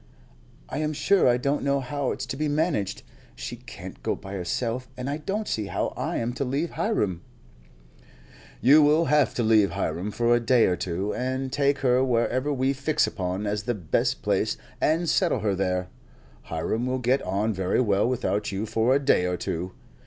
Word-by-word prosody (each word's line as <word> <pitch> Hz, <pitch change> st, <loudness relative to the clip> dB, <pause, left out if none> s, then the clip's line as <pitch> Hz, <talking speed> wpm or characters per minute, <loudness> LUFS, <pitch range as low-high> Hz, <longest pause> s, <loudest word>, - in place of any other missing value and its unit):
"I 140 Hz, -, -4 dB
am 155 Hz, 0 st, -1 dB
sure 170 Hz, +5 st, +3 dB
I 120 Hz, 0 st, +4 dB
don't 140 Hz, +3 st, 0 dB
know 140 Hz, 0 st, +1 dB
how 135 Hz, +1 st, -2 dB
it's -, -, -4 dB
to 135 Hz, -, -5 dB
be 155 Hz, +2 st, -1 dB
managed. 145 Hz, -, -1 dB, 0.3 s
She -, -, -6 dB
can't -, -, -10 dB
go -, -, -1 dB
by 95 Hz, -, -9 dB
herself, 115 Hz, +7 st, -2 dB
and 125 Hz, +1 st, -4 dB
I 145 Hz, +1 st, -1 dB
don't 195 Hz, +8 st, -3 dB
see 105 Hz, -2 st, -2 dB
how -, -, -2 dB
I -, -, -2 dB
am 120 Hz, +1 st, -2 dB
to 140 Hz, -, -2 dB
leave 140 Hz, +6 st, -1 dB
Hiram." 105 Hz, -, -1 dB, 1.4 s
"You 150 Hz, +4 st, +7 dB
will 150 Hz, +3 st, +4 dB
have 150 Hz, -2 st, +2 dB
to 120 Hz, -, 0 dB
leave 110 Hz, -5 st, +4 dB
Hiram 90 Hz, +4 st, -2 dB
for 120 Hz, +3 st, +2 dB
a -, -, +3 dB
day 120 Hz, 0 st, +4 dB
or 90 Hz, -, +2 dB
two, 95 Hz, +4 st, -2 dB
and 130 Hz, +1 st, -2 dB
take 140 Hz, 0 st, +2 dB
her 125 Hz, +1 st, +4 dB
wherever 130 Hz, +3 st, +1 dB
we 135 Hz, 0 st, +1 dB
fix 145 Hz, +3 st, +1 dB
upon 95 Hz, +1 st, -3 dB
as 105 Hz, 0 st, -1 dB
the 120 Hz, +3 st, -2 dB
best 85 Hz, -7 st, -1 dB
place -, -, +1 dB, 0.2 s
and 165 Hz, +3 st, +2 dB
settle -, -, +2 dB
her 105 Hz, -2 st, +1 dB
there. 90 Hz, -1 st, -1 dB, 0.6 s
Hiram 110 Hz, +9 st, -2 dB
will 130 Hz, 0 st, 0 dB
get 130 Hz, +2 st, +1 dB
on 100 Hz, +4 st, -1 dB
very 95 Hz, -1 st, 0 dB
well 105 Hz, -2 st, +2 dB
without 105 Hz, -5 st, -1 dB
you 100 Hz, +2 st, -2 dB
for 115 Hz, +4 st, +2 dB
a -, -, +3 dB
day 135 Hz, -10 st, +3 dB
or 90 Hz, 0 st, -1 dB
two. 90 Hz, +2 st, -3 dB
125 Hz, 195 wpm, -26 LUFS, 100-140 Hz, 1.4 s, You